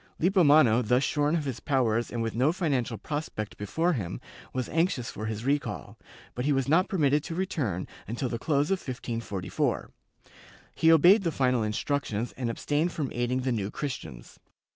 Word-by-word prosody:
Lippomano, 155 Hz, -, +5 dB
thus 125 Hz, +3 st, +2 dB
shorn 150 Hz, +2 st, +1 dB
of 155 Hz, -3 st, -1 dB
his 135 Hz, -4 st, -3 dB
powers 120 Hz, -4 st, +1 dB
and 115 Hz, -1 st, -2 dB
with 115 Hz, -, -2 dB
no 130 Hz, +6 st, +3 dB
financial 140 Hz, -, -1 dB
prospect 145 Hz, -9 st, -4 dB
before 160 Hz, -, 0 dB
him, 100 Hz, -, -4 dB, 0.3 s
was 130 Hz, -2 st, -2 dB
anxious 160 Hz, -7 st, 0 dB
for 110 Hz, -1 st, -5 dB
his 110 Hz, +1 st, -4 dB
recall, 145 Hz, +1 st, -2 dB, 0.4 s
but 125 Hz, -, -3 dB
he 145 Hz, -, +1 dB
was 135 Hz, -2 st, +1 dB
not 165 Hz, +6 st, +3 dB
permitted 150 Hz, -5 st, +2 dB
to 165 Hz, -, -5 dB
return 145 Hz, -, -2 dB, 0.2 s
until 120 Hz, +5 st, -2 dB
the 115 Hz, -1 st, -3 dB
close 145 Hz, +4 st, +1 dB
of 195 Hz, -, +2 dB
1544; 115 Hz, -, -3 dB, 0.8 s
he 160 Hz, -, +4 dB
obeyed 175 Hz, +7 st, +7 dB
the 170 Hz, -4 st, 0 dB
final 125 Hz, -4 st, +1 dB
instructions 110 Hz, +1 st, -2 dB
and 125 Hz, -3 st, -3 dB
abstained 150 Hz, +8 st, 0 dB
from 145 Hz, -6 st, -3 dB
aiding 120 Hz, +2 st, 0 dB
the 130 Hz, 0 st, -1 dB
New 105 Hz, -4 st, -1 dB
Christians. 105 Hz, -, -6 dB
130 Hz, 170 wpm, -28 LUFS, 115-155 Hz, 0.8 s, obeyed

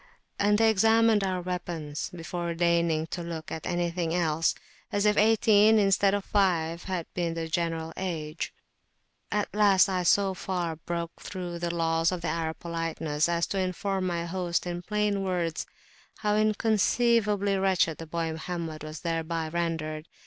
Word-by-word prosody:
And 205 Hz, +1 st, +3 dB
they 225 Hz, 0 st, +5 dB
examined 225 Hz, 0 st, +4 dB
our 185 Hz, -2 st, -1 dB
weapons, 175 Hz, -5 st, -4 dB
before 170 Hz, -1 st, -4 dB
deigning 170 Hz, -2 st, +2 dB
to 175 Hz, -, -3 dB
look 165 Hz, -2 st, -6 dB
at 160 Hz, -, -5 dB
anything 175 Hz, -1 st, -1 dB
else, 165 Hz, -2 st, +1 dB, 0.4 s
as 205 Hz, 0 st, +1 dB
if 210 Hz, 0 st, +4 dB
eighteen 215 Hz, 0 st, +5 dB
instead 195 Hz, -1 st, +3 dB
of 200 Hz, -, -3 dB
five 170 Hz, -4 st, +1 dB
had 185 Hz, -4 st, -2 dB
been 170 Hz, -2 st, -1 dB
the 165 Hz, -1 st, -3 dB
general 165 Hz, -1 st, -2 dB
age. 165 Hz, -4 st, -4 dB, 0.8 s
At 210 Hz, 0 st, -1 dB
last 200 Hz, -2 st, +5 dB
I 185 Hz, -1 st, 0 dB
so 195 Hz, +2 st, +3 dB
far 180 Hz, -3 st, -3 dB
broke 170 Hz, +1 st, -5 dB
through 175 Hz, -2 st, -5 dB
the 170 Hz, 0 st, -1 dB
laws 165 Hz, 0 st, +1 dB
of 175 Hz, -2 st, -4 dB
Arab 160 Hz, 0 st, -2 dB
politeness 165 Hz, -2 st, -2 dB
as 170 Hz, 0 st, +1 dB
to 195 Hz, -, 0 dB
inform 185 Hz, +1 st, -1 dB
my 170 Hz, -1 st, -2 dB
host 175 Hz, 0 st, -1 dB
in 175 Hz, 0 st, -3 dB
plain 210 Hz, +1 st, 0 dB
words 175 Hz, -4 st, -2 dB, 0.5 s
how 210 Hz, -1 st, +2 dB
inconceivably 215 Hz, -1 st, +2 dB
wretched 185 Hz, -4 st, +2 dB
the 165 Hz, -, -7 dB
boy 165 Hz, 0 st, -2 dB
Mohammed 160 Hz, -1 st, -5 dB
was 155 Hz, 0 st, -7 dB
thereby 165 Hz, -1 st, -2 dB
rendered! 160 Hz, -2 st, -3 dB
175 Hz, 155 wpm, -28 LUFS, 165-195 Hz, 0.8 s, they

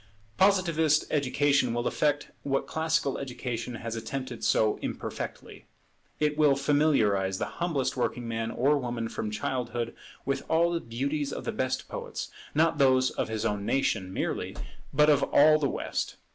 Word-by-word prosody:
Positivist 170 Hz, -6 st, +3 dB
education 140 Hz, -3 st, +2 dB
will 120 Hz, 0 st, -1 dB
effect 145 Hz, -1 st, 0 dB
what 135 Hz, -1 st, -1 dB
classical 160 Hz, -3 st, 0 dB
education 125 Hz, -3 st, -4 dB
has 115 Hz, 0 st, -5 dB
attempted 120 Hz, +2 st, -5 dB
so 110 Hz, -1 st, +3 dB
imperfectly. -, -, -6 dB, 0.5 s
It 150 Hz, 0 st, 0 dB
will 145 Hz, -3 st, +5 dB
familiarize 135 Hz, -10 st, +2 dB
the -, -, -1 dB, 0.2 s
humblest 160 Hz, -7 st, 0 dB
working 120 Hz, -1 st, -2 dB
man 115 Hz, 0 st, -2 dB
or 140 Hz, +5 st, +2 dB
woman 120 Hz, -3 st, -3 dB
from 110 Hz, -, -3 dB
childhood 120 Hz, +2 st, -3 dB, 0.3 s
with 135 Hz, 0 st, -1 dB
all 170 Hz, +1 st, +3 dB
the 170 Hz, -, 0 dB
beauties 140 Hz, +5 st, -2 dB
of -, -, -5 dB
the -, -, -2 dB
best -, -, -2 dB
poets; -, -, -5 dB, 0.3 s
not 160 Hz, 0 st, +3 dB
those 130 Hz, -1 st, +4 dB
of -, -, -2 dB
his 110 Hz, 0 st, -2 dB
own 105 Hz, -2 st, -1 dB
nation 100 Hz, -6 st, 0 dB
merely, -, -, -3 dB, 0.4 s
but 150 Hz, +2 st, +4 dB
of 150 Hz, -2 st, +5 dB
all 155 Hz, +1 st, +5 dB
the 140 Hz, -3 st, +1 dB
West. -, -, -3 dB
135 Hz, 155 wpm, -28 LUFS, 115-150 Hz, 0.5 s, will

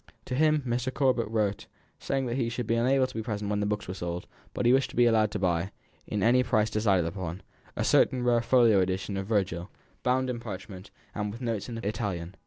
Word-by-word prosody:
To -, -, -5 dB
him 155 Hz, +2 st, +3 dB
Mr. 125 Hz, +1 st, -1 dB
Corbet 130 Hz, -5 st, +1 dB
wrote, 105 Hz, -3 st, -1 dB, 0.3 s
saying 135 Hz, -1 st, -1 dB
that 120 Hz, -1 st, -2 dB
he 120 Hz, -3 st, 0 dB
should 120 Hz, 0 st, -3 dB
be 115 Hz, -, 0 dB
unable 130 Hz, +3 st, +3 dB
to 130 Hz, -, -8 dB
be 110 Hz, -, -3 dB
present 105 Hz, -2 st, -3 dB
when 105 Hz, -, 0 dB
the 105 Hz, -, 0 dB
books 105 Hz, 0 st, -2 dB
were 90 Hz, -, -4 dB
sold, 85 Hz, -2 st, -4 dB, 0.3 s
but -, -, -3 dB
that -, -, -2 dB
he -, -, +6 dB
wished 135 Hz, 0 st, +2 dB
to -, -, -11 dB
be 120 Hz, -, +5 dB
allowed 110 Hz, -2 st, +3 dB
to 105 Hz, -, -3 dB
buy 90 Hz, -1 st, 0 dB, 0.4 s
in, 105 Hz, -2 st, -2 dB
at 115 Hz, -, +5 dB
any 125 Hz, +1 st, +5 dB
price 110 Hz, -3 st, +1 dB
decided 100 Hz, -5 st, +2 dB
upon, 90 Hz, +1 st, -5 dB, 0.3 s
a -, -, -1 dB
certain 125 Hz, -1 st, +3 dB
rare 120 Hz, -1 st, +3 dB
folio 115 Hz, -4 st, +4 dB
edition 95 Hz, +2 st, -1 dB
of 95 Hz, 0 st, -3 dB
Virgil, 95 Hz, -4 st, -1 dB, 0.3 s
bound 130 Hz, +1 st, +1 dB
in 125 Hz, -2 st, -3 dB
parchment, 95 Hz, -2 st, -8 dB, 0.2 s
and 105 Hz, 0 st, -3 dB
with 115 Hz, -, -8 dB
notes 115 Hz, -4 st, -3 dB
in 115 Hz, -, -5 dB
Italian. 100 Hz, -5 st, -3 dB
110 Hz, 235 wpm, -28 LUFS, 100-125 Hz, 0.4 s, he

